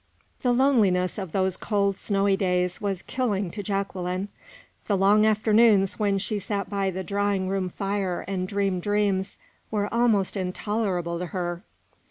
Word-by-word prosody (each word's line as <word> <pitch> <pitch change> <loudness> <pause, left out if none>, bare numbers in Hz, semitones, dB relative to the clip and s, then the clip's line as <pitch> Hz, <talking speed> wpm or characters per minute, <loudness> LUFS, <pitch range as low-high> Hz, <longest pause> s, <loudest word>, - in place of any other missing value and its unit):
The 250 - +2
loneliness 215 -9 +2
of 190 -4 -5
those 190 0 0
cold, 200 -2 0
snowy 195 0 +1
days 180 -2 0
was 195 -3 -2
killing 205 -8 -1
to 205 - -5
Jacqueline. 195 -1 -3 0.6
The 200 - +2
long 205 +3 +5
afternoons 215 -2 +4
when 200 -2 +2
she 205 +2 -2
sat 200 0 -3
by 195 -1 0
the 190 0 -4
drawing 200 0 0
room 190 -1 -1
fire 195 -1 -2
and 185 -1 -2
dreamed 195 -2 -1
dreams, 205 -1 0 0.3
were 205 -1 -2
almost 225 -5 +2
intolerable 185 -2 -2
to 180 - -3
her. 175 -1 -3
195 Hz, 150 wpm, -25 LUFS, 185-205 Hz, 0.6 s, long